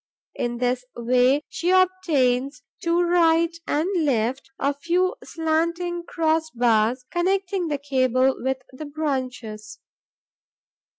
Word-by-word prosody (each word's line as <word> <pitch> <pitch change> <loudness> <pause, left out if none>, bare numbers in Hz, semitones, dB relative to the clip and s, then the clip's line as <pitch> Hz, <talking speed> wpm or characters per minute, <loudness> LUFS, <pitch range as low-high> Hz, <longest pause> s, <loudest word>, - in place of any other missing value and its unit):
In 240 0 -3
this 250 +1 0
way, 250 +4 +2
she 345 - -2
obtains, 290 -9 +2 0.2
to 340 +1 +2
right 335 -1 +3
and 305 +4 0 0.2
left, 255 -1 0
a 280 - 0
few 345 +7 0
slanting 335 +2 -1
cross 320 -1 0
bars, 240 0 +1
connecting 370 0 0
the 295 -2 -1
cable 260 -2 +2
with 265 0 -2
the 265 +4 -8
branches. 255 -8 -4
285 Hz, 110 wpm, -23 LUFS, 250-335 Hz, 0.2 s, right